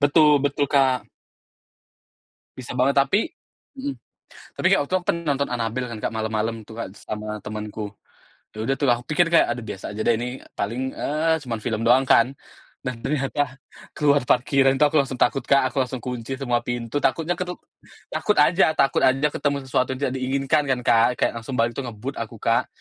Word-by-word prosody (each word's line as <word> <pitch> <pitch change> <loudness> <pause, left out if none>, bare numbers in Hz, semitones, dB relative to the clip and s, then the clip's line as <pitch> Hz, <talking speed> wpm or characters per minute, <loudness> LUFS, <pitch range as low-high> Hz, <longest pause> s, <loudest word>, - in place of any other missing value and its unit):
Betul 145 0 +5
betul, 145 0 +1
Kak. 135 -3 +2 1.5
Bisa - - -7
banget. - - +3
Tapi - - +2 0.5
mhm. 275 +1 -4 0.6
Tapi, - - 0
Kak, 195 - +5
waktu 185 - -2
aku 180 - -3
pen 170 - 0
nonton 140 0 +1
Annabelle 120 +1 -2
kan, 110 - -6
Kak, - - -2
malam-malam 110 0 -2
tuh, 110 - -12
Kak, - - -4
sama 105 0 -5
temanku. 105 0 -5 0.6
Ya 110 0 -4
udah 135 +4 +1
tuh, 140 - +1
aku 120 0 +1
pikir 170 +2 +3
kayak, 170 - +5
aduh, 120 - -6
biasa 100 -2 -6
aja 110 - -6
deh 120 - +4
ini, 125 +3 -5 0.2
paling, 125 +6 -2
eee, 160 +2 +1
cuman 115 -3 -4
film 110 -1 -2
doang 125 +3 +5
kan. 125 +3 +5 0.5
Dan 125 -2 -4
ternyata, 140 -1 -1 0.4
keluar 145 -1 +3
parkiran 135 +1 +3
tuh 150 - +6
aku - - +1
langsung 130 -2 -7
takut, 125 +1 +2
Kak, 140 -1 +3
aku 135 -1 +1
langsung 125 0 -6
kunci 125 0 -4
semua 120 -3 +1
pintu, 120 +2 -2
takutnya 165 +2 +1
keru 180 -1 -3 0.6
takut 210 - +1
aja 165 +1 +4
takut 135 - +3
aja 135 +3 +3
ketemu 140 0 0
sesuatu 130 0 0
yang - - -11
tidak 130 - -4
diinginkan 135 +3 +1
kan, 130 -2 +1
Kak. 115 0 +5
Kayak - - +2
langsung 125 +3 -6
balik 115 +1 +2
tuh 140 - -3
ngebut 120 +4 -6
aku, 115 0 -6
Kak. 115 +2 +2
130 Hz, 190 wpm, -23 LUFS, 115-145 Hz, 1.5 s, tuh